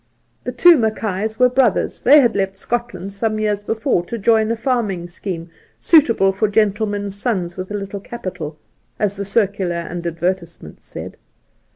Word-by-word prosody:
The -, -, -2 dB
two 350 Hz, -4 st, +6 dB
Mackays 220 Hz, -1 st, -1 dB
were 250 Hz, -, +5 dB
brothers; 250 Hz, -4 st, +1 dB
they 290 Hz, +3 st, +7 dB
had 240 Hz, -, +2 dB
left 195 Hz, -1 st, -1 dB
Scotland 195 Hz, -4 st, -4 dB
some 215 Hz, +2 st, -1 dB
years 210 Hz, -1 st, -1 dB
before 225 Hz, -3 st, 0 dB
to 235 Hz, -, -5 dB
join 220 Hz, +1 st, +3 dB
a 230 Hz, -, +1 dB
farming 225 Hz, -7 st, -1 dB
scheipe 175 Hz, -1 st, -5 dB, 0.3 s
'suit 310 Hz, -5 st, +5 dB
able 195 Hz, -4 st, +3 dB
for 200 Hz, +3 st, 0 dB
gentlemen's 205 Hz, -1 st, 0 dB
sons 190 Hz, -6 st, -2 dB
with 185 Hz, 0 st, -6 dB
a 205 Hz, -, -4 dB
little 200 Hz, 0 st, -5 dB
capital/ 185 Hz, -8 st, -7 dB, 0.4 s
as 205 Hz, -1 st, 0 dB
the 200 Hz, 0 st, -4 dB
circular 195 Hz, -3 st, 0 dB
and 170 Hz, 0 st, -4 dB
advertisements 170 Hz, -, -4 dB
said. -, -, -8 dB
205 Hz, 165 wpm, -19 LUFS, 185-225 Hz, 0.4 s, they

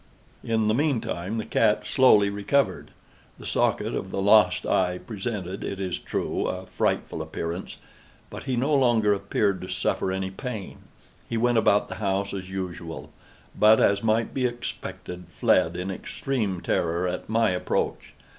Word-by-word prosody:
In 110 Hz, -2 st, +1 dB
the 110 Hz, -, +3 dB
meantime 115 Hz, -, -1 dB
the 110 Hz, -, -3 dB
cat -, -, +2 dB
slowly 105 Hz, -6 st, +5 dB
recovered. 105 Hz, +8 st, 0 dB, 0.5 s
The -, -, -11 dB
socket -, -, 0 dB
of -, -, -3 dB
the -, -, -3 dB
lost 105 Hz, +2 st, +4 dB
eye 90 Hz, -1 st, +1 dB
presented, 100 Hz, -3 st, -5 dB
it 100 Hz, -, -4 dB
is 95 Hz, -2 st, -2 dB
true, -, -, -2 dB
a -, -, -4 dB
frightful -, -, -1 dB
appearance, 85 Hz, +3 st, -5 dB, 0.5 s
but -, -, -8 dB
he 130 Hz, -2 st, -1 dB
no 135 Hz, +5 st, +1 dB
longer 120 Hz, -6 st, +4 dB
appeared 100 Hz, 0 st, 0 dB
to 90 Hz, -, -6 dB
suffer 95 Hz, -, -1 dB
any 95 Hz, 0 st, -2 dB
pain. 105 Hz, 0 st, -6 dB, 0.5 s
He 115 Hz, -, -1 dB
went 120 Hz, 0 st, +3 dB
about 105 Hz, -2 st, +3 dB
the -, -, -6 dB
house 100 Hz, 0 st, -1 dB
as 95 Hz, -1 st, -5 dB
usual, 90 Hz, -3 st, -6 dB, 0.4 s
but, 110 Hz, +1 st, +6 dB
as 100 Hz, 0 st, +3 dB
might 115 Hz, 0 st, +1 dB
be 130 Hz, -2 st, +1 dB
expected, 90 Hz, -6 st, -6 dB
fled 85 Hz, +1 st, +2 dB
in 90 Hz, +2 st, -3 dB
extreme 100 Hz, -2 st, -3 dB
terror 85 Hz, 0 st, 0 dB
at 90 Hz, +3 st, -4 dB
my 110 Hz, -2 st, +3 dB
approach. 90 Hz, -, -2 dB
100 Hz, 155 wpm, -26 LUFS, 95-115 Hz, 0.5 s, but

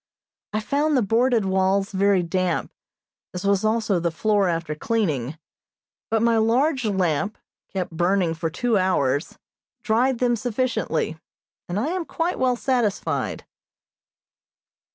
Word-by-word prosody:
I 215 Hz, -, -1 dB
found 285 Hz, +6 st, +1 dB
the 245 Hz, -, +3 dB
boarded 230 Hz, +1 st, +2 dB
walls 190 Hz, +1 st, +1 dB
very 195 Hz, -1 st, +2 dB
damp, 180 Hz, 0 st, -1 dB, 0.6 s
as 180 Hz, +2 st, -4 dB
was 200 Hz, 0 st, +2 dB
also 215 Hz, -3 st, +1 dB
the 170 Hz, 0 st, 0 dB
floor 200 Hz, +3 st, +1 dB
after 165 Hz, -2 st, -2 dB
cleaning, 155 Hz, -, -1 dB, 0.7 s
but 225 Hz, 0 st, +1 dB
my 230 Hz, -1 st, +3 dB
large 250 Hz, +4 st, +2 dB
lamp, 190 Hz, -1 st, 0 dB, 0.3 s
kept 185 Hz, -3 st, -3 dB
burning 175 Hz, +1 st, +1 dB
for 165 Hz, 0 st, -3 dB
two 225 Hz, +5 st, +1 dB
hours, 145 Hz, -6 st, 0 dB, 0.5 s
dried 245 Hz, +3 st, +2 dB
them 240 Hz, 0 st, +2 dB
sufficiently, 220 Hz, -9 st, -1 dB, 0.5 s
and 180 Hz, +3 st, -1 dB
I 265 Hz, +8 st, -1 dB
am 360 Hz, -1 st, -2 dB
quite 335 Hz, +3 st, -2 dB
well 255 Hz, -1 st, +2 dB
satisfied. 240 Hz, -4 st, -1 dB
205 Hz, 130 wpm, -23 LUFS, 180-240 Hz, 0.7 s, the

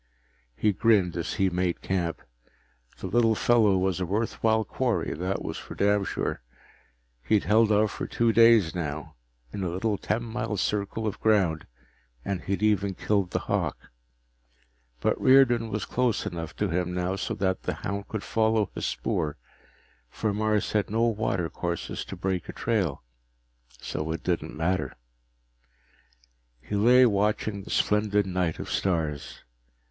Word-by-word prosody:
He 105 Hz, -, +2 dB
grinned 100 Hz, -4 st, +3 dB
as 85 Hz, 0 st, -3 dB
he 95 Hz, -2 st, +1 dB
made 90 Hz, 0 st, -1 dB
camp. 85 Hz, -3 st, -2 dB, 0.7 s
The -, -, -7 dB
little 115 Hz, +3 st, +3 dB
fellow 110 Hz, -4 st, +4 dB
was 95 Hz, -1 st, 0 dB
a 90 Hz, -, -1 dB
worthwhile 110 Hz, +2 st, +1 dB
quarry, 120 Hz, -10 st, -1 dB
that 90 Hz, +5 st, -3 dB
was -, -, -4 dB
for -, -, -9 dB
damn 100 Hz, 0 st, +2 dB
sure. -, -, -3 dB, 0.8 s
He'd 100 Hz, -, +2 dB
held 110 Hz, +1 st, +4 dB
out 105 Hz, 0 st, +3 dB
for -, -, -5 dB
two 115 Hz, -1 st, +1 dB
days 115 Hz, -7 st, +6 dB
now, 75 Hz, -3 st, -4 dB, 0.4 s
in 100 Hz, -, -4 dB
a 90 Hz, -, -1 dB
little 100 Hz, +4 st, -1 dB
ten 120 Hz, -, -1 dB
mile 115 Hz, -2 st, -3 dB
circle 105 Hz, +3 st, -1 dB
of 105 Hz, -, -3 dB
ground, 95 Hz, -8 st, +2 dB, 0.6 s
and 95 Hz, -3 st, -2 dB
he'd 100 Hz, +2 st, -2 dB
even 100 Hz, -2 st, +2 dB
killed 100 Hz, -2 st, 0 dB
the -, -, -2 dB
hawk. -, -, -2 dB, 1.1 s
But -, -, 0 dB
Riordan 120 Hz, -4 st, +5 dB
was 105 Hz, -1 st, -3 dB
close 125 Hz, -3 st, 0 dB
enough 85 Hz, -2 st, -5 dB
to 105 Hz, -, -1 dB
him 90 Hz, +1 st, -1 dB
now 90 Hz, +1 st, -1 dB
so 100 Hz, -, -3 dB
that 95 Hz, -1 st, -1 dB
the -, -, -3 dB
hound 100 Hz, 0 st, -4 dB
could 110 Hz, -2 st, -4 dB
follow 110 Hz, -2 st, +1 dB
his -, -, -3 dB
spoor, 70 Hz, +4 st, -2 dB, 0.7 s
for 105 Hz, -, -2 dB
Mars 105 Hz, 0 st, 0 dB
had 105 Hz, -3 st, 0 dB
no 115 Hz, +2 st, +1 dB
watercourses 90 Hz, -5 st, -2 dB
to -, -, -7 dB
break 95 Hz, -1 st, -2 dB
a -, -, -5 dB
trail. 95 Hz, -, -1 dB, 0.8 s
So 75 Hz, +1 st, -4 dB
it 80 Hz, -, -6 dB
didn't 85 Hz, -4 st, -2 dB
matter. 90 Hz, +4 st, -1 dB, 1.6 s
He 105 Hz, -, -5 dB
lay 125 Hz, +5 st, +6 dB
watching 105 Hz, -1 st, 0 dB
the -, -, -12 dB
splendid 105 Hz, -1 st, +2 dB
night 90 Hz, -3 st, -1 dB
of -, -, -6 dB
stars. 80 Hz, -6 st, -2 dB
100 Hz, 150 wpm, -27 LUFS, 90-110 Hz, 1.6 s, days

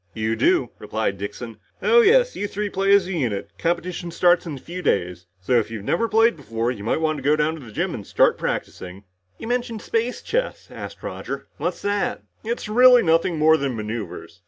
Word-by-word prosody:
"You 110 Hz, +1 st, -1 dB
do," 355 Hz, -, +2 dB
replied -, -, -2 dB
Dixon. -, -, -7 dB, 0.2 s
"Oh, 470 Hz, 0 st, +5 dB
yes, -, -, +4 dB
you 205 Hz, -, -2 dB
three 205 Hz, 0 st, -4 dB
play 195 Hz, +1 st, +1 dB
as 200 Hz, -3 st, +3 dB
a 190 Hz, -, -5 dB
unit. 120 Hz, -, -2 dB
Competition 175 Hz, +1 st, -2 dB
starts 175 Hz, +1 st, +3 dB
in 155 Hz, -, -4 dB
a -, -, -8 dB
few 175 Hz, +6 st, -7 dB
days. 90 Hz, -, -1 dB
So 120 Hz, +6 st, +2 dB
if 115 Hz, -, -3 dB
you've 110 Hz, -3 st, -6 dB
never 225 Hz, -, 0 dB
played 225 Hz, -1 st, +4 dB
before, 115 Hz, -5 st, -2 dB
you 105 Hz, -5 st, -7 dB
might 115 Hz, -, 0 dB, 0.2 s
go 145 Hz, +3 st, +3 dB
down 155 Hz, +1 st, +1 dB
to 160 Hz, -, -8 dB
the 115 Hz, -, -11 dB
gym -, -, -2 dB
and -, -, -7 dB
start -, -, +3 dB
practicing." 95 Hz, +2 st, -5 dB, 0.3 s
"You -, -, -8 dB
mentioned 240 Hz, -2 st, -2 dB
space 235 Hz, +2 st, -2 dB
chess," -, -, -2 dB
asked -, -, -9 dB
Roger. -, -, -5 dB
"What's -, -, -3 dB
that?" 205 Hz, +5 st, -1 dB, 0.2 s
"It's 230 Hz, 0 st, -3 dB
really 245 Hz, +2 st, +6 dB
nothing 165 Hz, 0 st, +2 dB
more 160 Hz, +1 st, +5 dB
than 135 Hz, -4 st, -2 dB
maneuvers. 105 Hz, -5 st, -6 dB
170 Hz, 200 wpm, -23 LUFS, -, 0.3 s, really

